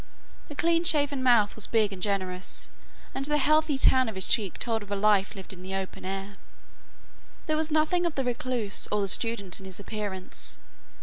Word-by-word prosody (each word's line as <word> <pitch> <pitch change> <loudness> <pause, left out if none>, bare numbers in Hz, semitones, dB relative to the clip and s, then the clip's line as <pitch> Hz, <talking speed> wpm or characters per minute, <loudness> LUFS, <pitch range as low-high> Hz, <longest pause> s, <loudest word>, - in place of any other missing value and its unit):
The 295 - -9
clean 335 +2 +2
shaven 290 -5 +2
mouth 235 -5 +4
was 220 - +4
big 215 -3 +2
and 185 - -9
generous, 185 -2 -3 0.4
and 270 - -3
the 295 +1 +2
healthy 305 0 +3
tan 260 -2 +4
of 220 - -7
his 190 - -1
cheek 200 -5 +1
told 225 -2 -1
of 205 - -11
a 205 - -1
life 205 0 +2
lived 190 -1 -6
in 180 - -12
the 190 +1 -5
open 190 -1 -5
air. 195 +1 -5 1.1
There 310 - 0
was 315 0 +1
nothing 320 +3 +2
of 330 - -4
the 270 - 0
recluse 240 -4 0
or 210 - +1
the 200 - 0
student 200 -2 -1
in 190 - -10
his 185 0 -5
appearance. 200 -2 -5
215 Hz, 195 wpm, -27 LUFS, 195-285 Hz, 1.1 s, mouth